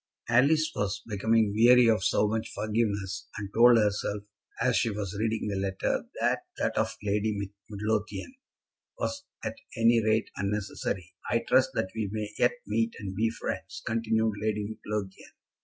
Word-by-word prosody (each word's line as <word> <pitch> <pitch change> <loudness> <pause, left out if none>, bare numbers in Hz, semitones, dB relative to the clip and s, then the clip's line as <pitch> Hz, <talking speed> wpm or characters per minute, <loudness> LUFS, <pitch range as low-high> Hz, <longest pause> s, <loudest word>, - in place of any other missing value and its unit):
Alice 155 +6 +4
was 100 -1 -2
becoming 110 0 +2
weary 120 +2 +7
of 110 -4 +3
so 105 - +3
much 110 +1 -2
forgiveness, 105 -3 -1
and 100 -1 -5
told 120 +1 +7
herself, 105 -1 0 0.4
as - - +2
she - - +2
was 100 -2 -4
reading 110 -1 0
the 100 - -2
letter, 95 0 -1
that - - +2 0.2
that - - -1
of - - 0
Lady 105 +1 0 0.3
Midlothian 105 - -2 0.6
was 285 -12 -3 0.2
at - - -4 0.2
any 115 0 +4
rate 110 +1 +1
unnecessary. 100 -2 -3 0.2
"I 115 - +1
trust 130 +1 +4
that 95 - -1
we 110 -3 -2
may 105 -1 -3
yet - - +4
meet 230 0 0
and 95 -2 -5
be 110 +4 +1
friends," 115 - -5
continued 110 -1 +1
Lady 105 -1 0 0.2
Midlothian. 105 -3 -5
110 Hz, 155 wpm, -28 LUFS, 100-115 Hz, 0.6 s, weary